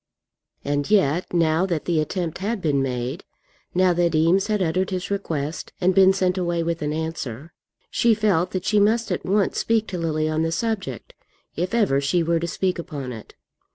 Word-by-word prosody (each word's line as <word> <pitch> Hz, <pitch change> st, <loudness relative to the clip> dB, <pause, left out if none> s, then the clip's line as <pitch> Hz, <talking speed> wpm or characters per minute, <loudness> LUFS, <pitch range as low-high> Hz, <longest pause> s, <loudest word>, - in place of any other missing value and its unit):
And 145 Hz, +2 st, -1 dB
yet, 180 Hz, -5 st, +2 dB
now 165 Hz, +1 st, +2 dB
that 170 Hz, -5 st, -2 dB
the 170 Hz, -3 st, +1 dB
attempt 170 Hz, +1 st, -3 dB
had 210 Hz, +3 st, -2 dB
been 145 Hz, -6 st, +1 dB
made, 130 Hz, +5 st, -3 dB, 0.5 s
now 185 Hz, 0 st, +4 dB
that 170 Hz, -1 st, +1 dB
Eames 170 Hz, +6 st, +3 dB
had 215 Hz, -1 st, 0 dB
uttered 185 Hz, +1 st, 0 dB
his 185 Hz, 0 st, -4 dB
request 160 Hz, -6 st, -3 dB
and 185 Hz, 0 st, +3 dB
been 190 Hz, 0 st, +6 dB
sent 185 Hz, -1 st, 0 dB
away 175 Hz, -1 st, 0 dB
with 165 Hz, 0 st, -2 dB
an 150 Hz, 0 st, -1 dB
answer, 155 Hz, -3 st, -5 dB, 0.4 s
she 235 Hz, -2 st, +3 dB
felt 195 Hz, -5 st, +1 dB
that 185 Hz, 0 st, -4 dB
she 210 Hz, 0 st, +3 dB
must 220 Hz, +1 st, +2 dB
at 180 Hz, -, -2 dB
once 200 Hz, +1 st, +1 dB
speak 225 Hz, -1 st, +1 dB
to 180 Hz, -, -4 dB
Lily 155 Hz, -2 st, 0 dB
on 155 Hz, 0 st, 0 dB
the 165 Hz, 0 st, 0 dB
subject, 190 Hz, -, -3 dB, 0.4 s
if 180 Hz, +6 st, -2 dB
ever 190 Hz, -12 st, +2 dB
she 165 Hz, +5 st, +1 dB
were 165 Hz, 0 st, +1 dB
to 170 Hz, -, -3 dB
speak 185 Hz, +1 st, -1 dB
upon 140 Hz, -6 st, -5 dB
it. 110 Hz, -2 st, -11 dB
170 Hz, 190 wpm, -23 LUFS, 155-190 Hz, 0.5 s, been